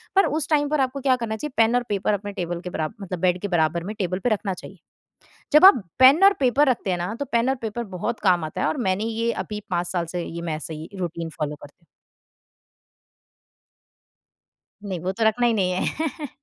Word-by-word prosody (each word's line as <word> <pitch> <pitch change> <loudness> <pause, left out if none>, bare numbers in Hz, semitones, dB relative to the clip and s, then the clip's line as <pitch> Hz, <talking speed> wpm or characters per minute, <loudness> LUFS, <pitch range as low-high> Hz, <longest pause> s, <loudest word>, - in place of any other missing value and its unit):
पर 390 - +6
उस 285 - -4
टाइम 290 -2 +2
पर 300 -2 +1
आपको 265 +1 -1
क्या 260 -1 +3
करना 230 -3 -3
चाहिए? 290 +4 -6
पेन 225 +1 +4
और 245 - +2
पेपर 205 +1 0
अपने 205 0 -3
टेबल 175 -3 -4
के 180 - -6
बराबर 155 -3 -4
मतलब 185 -3 -5
बेड 180 0 +1
के 205 - -2
बराबर 170 -2 +1
में, 210 +4 -6
टेबल 185 -1 -1
पे 245 - 0
रखना 205 -3 -1
चाहिए। - - -11 0.8
जब 305 +4 +8
आप 380 - +8 0.2
पेन 270 +8 +7
और 395 +1 +8
पेपर 275 +2 +3
रखते 225 -6 0
हैं 180 - 0
ना, 175 +4 -3
तो 285 - -2
पेन 235 +2 +2
और 265 - +1
पेपर 225 +2 -3
बहुत 225 +6 -3
काम 180 -4 +2
आता 155 - -5
हैं। - - +2
और - - -1
मैंने 190 +3 0
ये 230 +1 -1
अभी 210 -1 -5
5 175 -1 -1
साल 175 -2 -2
से 175 - -1
ये 170 0 -6
मैं 165 -2 -3
ऐसे 155 +1 -6
ही 155 +1 -8
रूटीन 170 -2 -4
फॉलो 150 -1 -2
करती 145 0 -15
हूँ। - - -30 3.0
नहीं, 190 -3 -4
वो 180 +3 -2
तो 225 +4 -2
रखना 230 +2 +3
ही 235 - +2
नहीं 190 -4 +1
है। 295 - -3
205 Hz, 225 wpm, -23 LUFS, 175-245 Hz, 3.0 s, जब